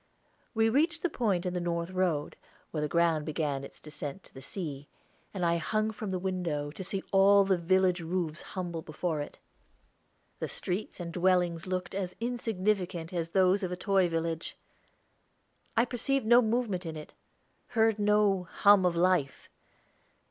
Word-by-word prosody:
We 225 0 +4
reached 315 +8 +1
the 350 - +1
point 200 -9 0
in 180 - -1
the 180 - -1
north 170 0 -2
road, 180 -6 0 0.4
where 155 - -2
the 150 - 0
ground 170 -2 +2
began 150 -3 -2
its - - -11
descent 150 +3 -7
to - - -18
the 135 - -10
sea, 145 -2 -6 0.4
and 185 -3 -2
I 170 0 +3
hung 215 +7 0
from 215 -1 -6
the 185 - -1
window, 175 -6 -2
to 190 - -7
see 195 +1 -3
all 200 +1 +6
the 190 -1 +3
village 185 +1 +2
roofs 170 -2 -2
humble 175 -3 -5
before 155 0 -3
it. 145 - -8 1.0
The - - -2
streets 185 +3 -4
and 170 -1 -5
dwellings 180 -1 +1
looked 185 0 -3
as 190 -2 -3
insignificant 200 -7 -1
as 165 -2 -2
those 190 +2 +3
of 185 -2 -2
a 180 - -3
toy 190 -2 +2
village. 165 0 -3 1.2
I 230 - +5
perceived 260 +2 -1
no 240 +2 +7
movement 220 -5 0
in 160 -2 -5
it, 150 - -10 0.5
heard 225 -2 +2
no 205 -3 +3
hum 200 -3 +5
of 175 - 0
life. 170 -6 +1
185 Hz, 165 wpm, -30 LUFS, 165-200 Hz, 1.2 s, no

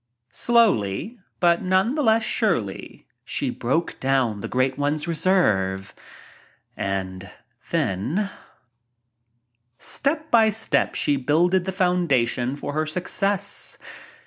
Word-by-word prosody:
Slowly, 220 - +2 0.2
but 170 -1 +3
none 185 +6 +2
the 300 - -1
less 225 -3 +3
surely, 120 - -2 0.2
she - - -2
broke 160 +8 -2
down 130 -6 +1
the - - -4
Great 130 +1 0
One's 145 +2 -1
reserve, 100 - +1 0.8
and 95 -1 -4 0.4
then 150 - -1 1.5
Step 310 +2 -2
by 225 -2 +6
step 220 +1 0
she 145 -2 +1
builded 170 +7 +2
the 190 - -2
foundation 140 - +1
for 145 0 -5
her 155 +1 -1
success. 185 +4 -1
160 Hz, 105 wpm, -23 LUFS, 120-195 Hz, 1.5 s, by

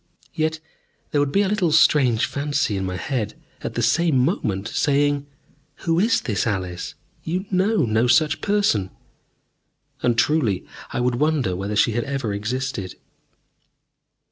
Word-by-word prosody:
Yet 160 0 -1 0.5
there 145 - +2
would 145 -1 0
be 200 +5 +3
a - - 0
little 190 -5 +1
strange 135 -7 +4
fancy 145 -5 -1
in 95 -1 -2
my 90 0 -3
head 115 +1 -3 0.3
at - - -5
the - - 0
same 165 -4 +3
moment, 120 - 0
saying, 145 +2 +1 0.6
"Who 165 0 +2
is 225 +4 +3
this 110 -3 -1
Alice? 95 +7 -3 0.3
You 180 +4 -2
know 190 - +2
no 110 +2 +2
such 155 +4 +3
person." 200 - +1 1.1
And 120 -2 +1
truly 120 - +1 0.3
I - - -2
would 125 0 +1
wonder 150 - +1
whether 100 +3 -3
she 105 - +3
had 120 +4 -1
ever 135 -6 -2
existed. 105 -1 -3
135 Hz, 145 wpm, -22 LUFS, 110-155 Hz, 1.1 s, strange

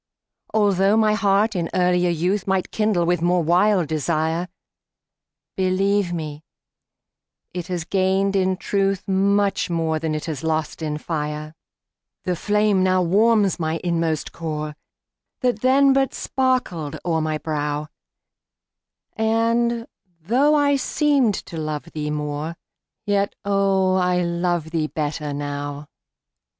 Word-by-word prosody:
Altho' 200 -1 +3
my 215 -1 +3
heart 210 +1 +2
in 170 -2 -1
earlier 180 -1 +2
youth 180 +5 0
Might 190 -1 0
kindle 210 -5 +1
with 175 -1 +1
more 175 0 +2
wild 180 +1 +3
desire, 160 +2 -1 1.1
Believe 190 0 +1
me, 155 -3 -5 1.1
it 175 -1 -5
has 180 -3 -3
gained 195 +1 +1
in 190 -1 +1
truth 195 +1 -1
Much 200 +1 +1
more 165 -2 0
than 155 -1 -2
it 155 - -4
has 155 -4 -5
lost 160 0 -2
in 150 -1 -2
fire. 150 -1 -4 0.7
The 180 - -1
flame 210 +1 +2
now 185 0 +3
warms 205 +2 +3
my 160 0 -1
inmost 165 -3 -1
core, 155 -2 -4 0.7
That 245 -4 0
then 270 +2 +5
but 270 0 +1
sparkled 250 - -1
o'er 165 -2 +1
my 155 0 -1
brow, 150 -1 -2 1.3
And, 230 +1 +1 0.3
though 255 - +3
I 285 -1 +3
seemed 275 -5 +2
to 165 - -8
love 155 -2 -3
thee 150 -1 -3
more, 150 +2 -3 0.5
Yet, 200 -1 0
oh, 195 -2 +2
I 180 -1 +2
love 170 -2 -1
thee 160 -2 0
better 150 -1 -3
now. 145 0 -5
180 Hz, 125 wpm, -22 LUFS, 160-205 Hz, 1.3 s, then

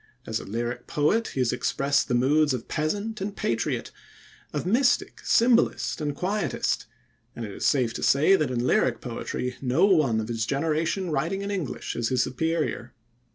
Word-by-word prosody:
As - - -2
a - - -9
lyric 120 +3 -4
poet, 205 +11 +1
he 130 - -2
has 125 -1 +1
expressed 140 +3 +1
the 125 - 0
moods 145 +3 +3
of 120 - -7
peasant 200 +7 -2
and 200 +1 -3
patriot, 115 -1 -2 0.6
of - - -3
mystic, 245 +7 +2
symbolist, 235 -7 +2
and 145 -1 -2
quietist, 195 +6 -1 0.5
and 115 - -5
it 105 - -7
is - - -1
safe 125 -5 +2
to - - -5
say 150 +8 +5
that 155 -7 0
in 120 -1 -1
lyric 120 -2 +2
poetry 125 +1 -4
no 135 +8 +3
one 155 - +3
of 110 - -3
his 115 -2 -2
generation 165 +5 0
writing 170 +8 -1
in 200 - -3
English 185 -9 -4
is 120 -1 -1
his 125 -1 +2
superior. 160 -3 -2
145 Hz, 175 wpm, -26 LUFS, 125-185 Hz, 0.6 s, say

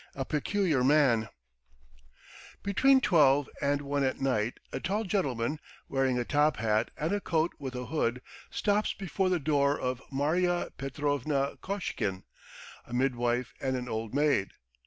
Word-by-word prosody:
A 135 - -3
PECULIAR 155 -2 +1
MAN 130 -6 +4 1.3
BETWEEN 265 +7 +4
twelve 145 - +4
and 140 0 +1
one 140 0 0
at 130 - 0
night 120 -4 0
a - - -2
tall 205 +4 -1
gentleman, 150 - -1 0.3
wearing 135 -2 +1
a 120 - -1
top 150 +2 +2
hat 110 0 +1
and 160 +6 -1
a 205 - 0
coat 165 -2 0
with 130 -2 -5
a 125 0 -4
hood, 125 -3 -1 0.3
stops 210 0 +1
before 190 0 -1
the 180 - +2
door 145 -1 +2
of 125 0 -2
Marya 175 +6 0
Petrovna 140 0 -1
Koshkin, 110 - -3 0.6
a 120 - -9
midwife 120 -2 0
and 130 -1 0
an 125 0 -5
old 110 +1 -4
maid. 145 -9 +2
140 Hz, 145 wpm, -29 LUFS, 125-160 Hz, 1.3 s, MAN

